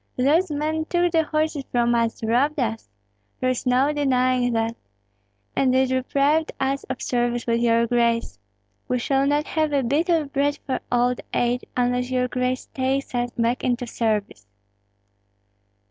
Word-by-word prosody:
Those 310 +8 +3
men 310 +2 -1
took 350 +1 +1
the 325 -1 +3
horses 310 -2 -1
from 240 -1 +2
us, 230 -1 0
robbed 260 +7 +1
us, 225 - -2 0.5
there 255 0 +1
is 255 0 -3
no 260 +4 +3
denying 255 -3 +1
that! 225 0 0 0.8
And 260 -2 +2
they 260 +1 +3
deprived 275 +4 +1
us 270 +1 -1
of 260 -1 -5
service 240 -1 -1
with 230 -1 +1
your 235 0 +3
grace. 235 - 0 0.5
We 250 - 0
shall 270 +2 +1
not 295 +1 +1
have 310 -2 -1
a 275 -2 +2
bit 290 +8 0
of 315 -5 +1
bread 285 +1 +1
for 260 - -1
old 245 0 +1
age, 245 +1 0
unless 250 0 +1
your 250 -1 +1
grace 255 0 -2
takes 265 +1 -1
us 245 0 0
back 235 +2 0
into 245 0 0
service." 210 - -2
255 Hz, 160 wpm, -23 LUFS, 240-285 Hz, 0.8 s, Those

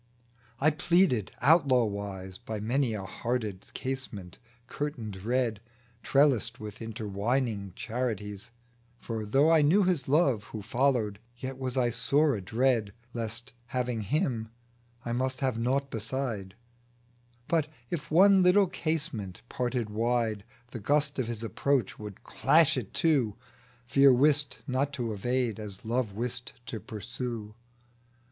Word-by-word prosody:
I 155 +3 +4
pleaded 155 - +2
outlaw 140 -3 +5
wise, 100 -2 -5
By 110 -1 -5
many 120 +2 0
a 100 - -4
hearted 105 0 -3
casement, 125 -9 -5 0.3
curtained 115 -10 -5
red, 120 -2 0 0.4
Trellised 125 -4 +3
with 105 0 -8
intertwining 110 -1 -2
charities; 110 -4 -3 0.5
For, 110 -3 -5
though 140 +8 +4
I 160 -2 +6
knew 170 +8 +5
His 180 -6 +1
love 135 -7 +3
Who 110 -2 -7
followed, 115 -3 +1 0.2
Yet 130 +1 -6
was 130 0 -3
I 120 -2 +3
sore 140 +6 +2
adread 110 +1 +1 0.2
(Lest, 115 +2 -3
having 125 -2 -1
Him, 115 - -1 0.6
I 120 - -2
must 130 +2 -1
have 130 -4 0
naught 135 +4 0
beside); 110 -4 -3 0.9
But, 160 -3 +2 0.2
if 150 -3 -3
one 190 +4 +6
little 185 +3 +6
casement 145 - -3
parted 120 -3 -2
wide, 115 -1 0 0.3
The 120 - -5
gust 145 +5 +1
of 125 - 0
his 115 -1 -4
approach 130 0 0
would 105 -2 -9
clash - - +4
it - - -5
to. 135 -11 +2 0.5
_Fear 135 0 +6
wist 145 +1 +2
not 135 +1 0
to 120 -5 -2
evade, 120 +1 -1
as 105 +2 -8
Love 115 -2 0
wist 120 +3 -3
to 115 -1 -5
pursue. 110 0 -6
120 Hz, 130 wpm, -29 LUFS, 110-135 Hz, 0.9 s, I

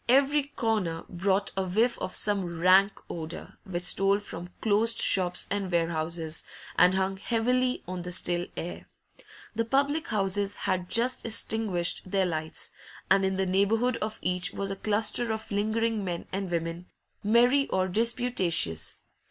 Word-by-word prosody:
Every 275 +2 +4
corner 205 -8 -1
brought 190 +2 0
a 190 - 0
whiff 220 +7 +1
of 185 - -3
some 190 -5 0
rank 190 +3 +5
odour, 165 -1 -7
which 180 -3 -4
stole 195 +2 +4
from 180 -4 -8
closed 225 +2 +3
shops 180 -2 +3
and 200 -2 -2
warehouses, 165 -1 -1 0.3
and 180 +2 +5
hung 190 0 0
heavily 250 +4 0
on 180 0 -4
the 180 +1 -6
still 175 0 0
air. 175 - -6 0.7
The 230 +1 0
public 280 +6 0
houses 200 -1 -1
had 185 -2 -2
just 245 +2 +1
extinguished 210 -6 +1
their 195 0 +1
lights, 160 -2 -4 0.4
and 195 0 +5
in 190 0 0
the 190 0 0
neighbourhood 220 +6 +1
of 215 0 -4
each 180 +1 -1
was 195 0 -3
a - - -3
cluster 215 +3 +1
of 220 0 -5
lingering 220 +1 0
men 175 -2 -4
and 195 -1 -2
women, 170 +1 -3 0.4
merry 245 +6 +4
or 185 0 0
disputatious. 190 - +1
195 Hz, 150 wpm, -28 LUFS, 180-225 Hz, 0.7 s, rank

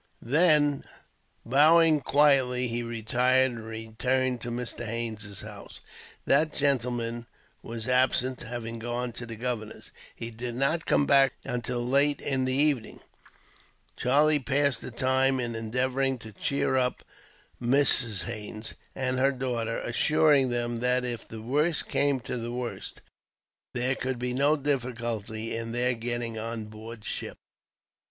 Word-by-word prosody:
Then, 145 +1 +3 0.6
bowing 155 +5 +5
quietly, 135 -4 +3
he 120 0 -2
retired; 125 +3 +1
and 115 -2 -8
returned 120 +3 -2
to 120 - -5
Mr. 120 0 -2
Haines' 110 -3 -4
house. - - -10 0.4
That 150 +3 +3
gentleman 120 -4 -1 0.3
was 115 0 -6
absent, 130 0 +2
having 115 -1 -6
gone 120 +1 -3
to 120 +1 -8
the 115 - -7
governor's. 115 -2 -5 0.2
He 115 - -6
did 120 +1 -5
not 140 +6 0
come 145 - +3
back 135 -2 +5
until 120 0 -3
late 140 +2 +3
in 130 -2 0
the 130 - +1
evening. 140 -5 +1 0.9
Charlie 150 +4 +3
passed 140 -2 +1
the - - -6
time 130 +2 +1
in 120 -1 -2
endeavouring 130 +4 -1
to 110 -2 -11
cheer 130 +4 0
up 125 -1 0 0.6
Mrs. 120 - +3
Haines, 110 -1 -5 0.2
and 130 -1 -1
her 135 +1 +4
daughter; 120 -4 -2
assuring 145 +2 +3
them 120 -1 -2
that, 125 +1 +1
if 120 -2 -4
the 110 -1 -9
worst 150 +6 +1
came 140 -2 +1
to 125 - -4
the 120 0 -4
worst, 125 0 -5 0.7
there 125 +2 +1
could 130 -1 -3
be 125 +1 -2
no 140 +4 +3
difficulty 115 -6 -3
in 115 0 -4
their 125 +1 +1
getting 120 -1 -4
on 115 0 -4
board 110 +1 -10
ship. - - -4
125 Hz, 140 wpm, -27 LUFS, 115-135 Hz, 0.9 s, bowing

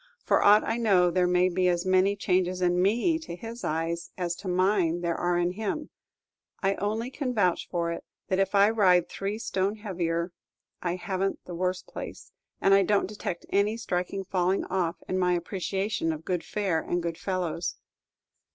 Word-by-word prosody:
For - - +3
aught 210 +1 +7
I 230 - -1
know, 190 -6 +4
there 180 0 +2
may 180 0 +3
be 185 0 +1
as 175 0 +1
many 185 +2 +3
changes 185 -2 0
in 180 0 +2
me 240 - +2
to 315 - -7
his 230 +5 -8
eyes 165 +2 -2
as 175 -2 -1
to 195 - -8
mine 180 -2 +2
there 170 -1 0
are 175 +1 0
in 175 0 +1
him. 220 +10 -4 0.7
I 195 0 +2
only 220 +5 -2
can 260 -3 -3
vouch 180 -5 +1
for 170 -1 -1
it, 170 - -5 0.2
that 190 - 0
if 195 +1 +1
I 200 +2 +6
ride 185 -6 +4
three 200 +2 -3
stone 195 -2 -1
heavier, 175 -5 -2 0.5
I 175 0 -1
have 185 +1 -3
n't 195 - -2
the 180 - -7
worse 180 +1 -1
place, - - -8 0.3
and 195 - +4
I 195 - +7
don't 200 +1 +2
detect 190 -3 -5
any 205 +3 +2
striking 195 -3 -2
falling 185 0 0
off 180 -2 -1
in 185 - -1
my 180 -1 +3
appreciation 190 +1 -1
of 155 0 -6
good 180 -2 -1
fare 195 -6 0
and 175 0 -2
good 170 0 -3
fellows. 180 -2 -2
185 Hz, 190 wpm, -27 LUFS, 175-200 Hz, 0.7 s, aught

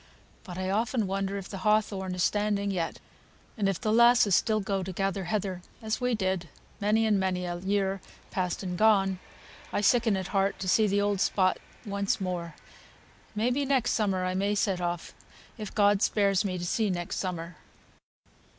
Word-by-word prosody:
But 180 -3 -8
I 185 0 -2
often 225 +2 0
wonder 195 +1 -2
if 195 - -6
the 195 - -7
hawthorn 200 -2 +1
is 180 - 0
standing 205 -1 +1
yet, 170 -4 -2 0.6
and 200 -3 +1
if 195 - -2
the 215 - 0
lasses 235 -3 +6
still 215 +3 +3
go 195 -1 -1
to 190 +1 -5
gather 195 +1 -2
heather, 190 -1 -2 0.2
as 220 +2 -3
we 250 -1 +1
did 185 -4 -2 0.3
many 215 +2 +2
and 210 -2 +3
many 185 -1 -1
a 175 0 -3
year 195 0 0 0.3
past 180 0 -2
and 180 -1 -3
gone. 195 -2 +3 0.5
I - - 0
sicken 225 -1 +3
at 190 -1 -4
heart 195 -1 +1
to 190 - -5
see 215 +4 +4
the 200 0 +1
old 200 -1 0
spot 185 -2 +2 0.3
once 200 -1 -1
again. 175 -3 -3 0.8
May 225 +4 +1
be 280 +3 0
next 265 -3 +1
summer 195 -4 0
I 185 - -1
may 200 +2 0
set 195 -3 0
off, 175 -1 -3 0.5
if 210 -2 -5
God 205 -1 +4
spares 200 -3 +2
me 185 -3 -2
to 175 - -4
see 215 +4 0
next 175 -2 -3
summer." 170 -3 -4
195 Hz, 185 wpm, -28 LUFS, 185-210 Hz, 0.8 s, lasses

